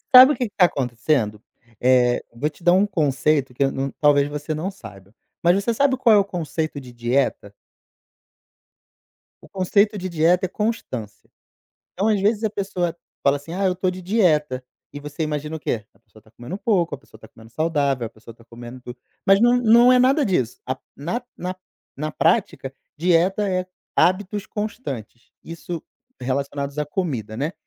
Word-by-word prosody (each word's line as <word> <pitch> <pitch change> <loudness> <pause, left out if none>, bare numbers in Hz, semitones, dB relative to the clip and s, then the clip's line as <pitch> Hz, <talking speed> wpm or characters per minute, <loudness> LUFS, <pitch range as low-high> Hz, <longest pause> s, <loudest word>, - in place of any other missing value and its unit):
Sabe 260 +3 +10
o - - -4
que 250 -3 -2
que - - -50
tá 180 - +6
acontecendo? 120 -6 -1 0.4
Eh, 125 -1 +3
vou 145 +6 -1
te 155 - -20
dar 175 +1 +5
um 195 +2 +4
conceito 145 -5 +1
que 130 - 0
eu 135 - +1
não 135 0 -3
talvez 145 -1 +4
você 150 +1 -4
não 180 +6 -3
saiba, 100 - -13 0.3
mas 175 - +5
você 200 +4 0
sabe 270 +2 +2
qual 230 -4 +5
é - - +7
o 200 - +4
conceito 160 -5 -3
de 125 - -12
dieta? 120 -3 -1 1.9
O - - -15
conceito 200 +3 +1
de 185 0 -4
dieta 170 +3 +2
é - - -5
constância. 190 - -4 0.6
Então 200 +4 0
às 210 -3 +2
vezes 210 +2 +1
a 220 - +1
pessoa 185 -4 -2 0.3
fala 140 0 +3
assim: 145 +4 -10
"Ah, 195 +3 -2
eu 185 - +2
estou 185 0 -1
de 185 0 -7
dieta", 155 - +1 0.3
e 145 - -7
você 150 +2 -5
imagina 150 +1 -3
o - - -7
quê? 110 -6 -2
A - - -29
pessoa 110 - -21
está 110 - -24
comendo 120 - -7
pouco, 180 -9 +1
a - - -8
pessoa - - -19
está - - -14
comendo 110 +1 -17
saudável, 140 -4 0
a - - -9
pessoa 115 +1 -14
está 115 0 -21
comendo 120 +2 -11
tu 125 0 -9 0.3
mas 195 +1 +6
não 240 +1 +5
não 240 +1 +6
é 250 - +5
nada 270 +3 +4
disso. 130 - -1
A 130 0 -3 0.2
na 175 - -3
na-na 180 -4 -7
prática, 165 - +1 0.2
dieta 180 +5 +2
é 185 -1 -1 0.3
hábitos 200 +3 +1
constantes, 170 - -6
isso 170 0 -7 0.4
relacionados 140 +2 -3
à 150 - +1
comida, 130 - -3
né. 150 +6 -2
160 Hz, 185 wpm, -22 LUFS, 130-195 Hz, 1.9 s, Sabe